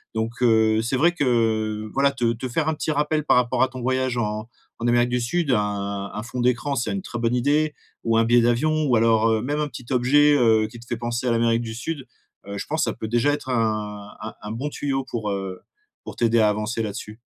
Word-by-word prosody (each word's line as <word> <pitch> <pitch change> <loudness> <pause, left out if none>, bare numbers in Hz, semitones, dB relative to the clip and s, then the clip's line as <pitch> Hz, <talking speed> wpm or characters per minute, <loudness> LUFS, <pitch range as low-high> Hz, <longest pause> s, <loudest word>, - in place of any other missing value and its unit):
Donc 110 +2 -3
heu, 110 -2 +4
c'est 120 +3 -1
vrai 170 +6 +4
que, 160 -4 -1
heu, 110 -3 0
voilà, 140 +1 +3
te 120 -3 0
te 120 +3 -5
faire 155 +6 0
un 160 - +1
petit 155 - -2
rappel 150 0 0
par - - +4
rapport 125 0 +1
à 130 - +3
ton 130 -1 -8
voyage 130 0 0
en 110 -1 -2 0.3
en 115 - -1
Amérique 120 0 +3
du 125 0 0
Sud, 155 +5 0
un 100 -2 -1
un 105 - -5
fond 120 +1 -4
d'écran, 125 +3 +1
c'est 120 - -1
une 195 - -2
très 120 - -6
bonne 115 0 0
idée 150 +4 +1 0.3
ou 115 -1 +2
un 115 - +4
billet 120 +1 +5
d'avion 155 +7 +2
ou 130 -4 +3
alors, 115 0 +3
heu, 110 - +1
même 145 +5 -2
un 150 - 0
petit 125 -2 -10
objet, 145 +4 +4
heu, 110 -3 +4
qui 120 - -12
te 115 - -14
fait 120 0 -3
penser 120 +1 -3
à 120 - +2
l'Amérique 115 0 +2
du 110 -1 -5
Sud, 135 +3 -5 0.4
heu, 100 0 -6
je - - -4
pense 155 +2 -1
que - - 0
ça - - -6
peut 110 - -6
déjà 120 +5 +2
être 145 - -4
un 105 -3 -2
un 110 +1 -6
un 105 - -6
bon 125 +7 -3
tuyau 135 -2 -2
pour, 110 -3 -3
heu, 95 -2 -4 0.4
pour - - -8
t'aider 115 -1 +3
à 105 -1 +5
avancer 105 +2 -2
là-dessus. 105 +1 -6
120 Hz, 250 wpm, -23 LUFS, 110-130 Hz, 0.4 s, billet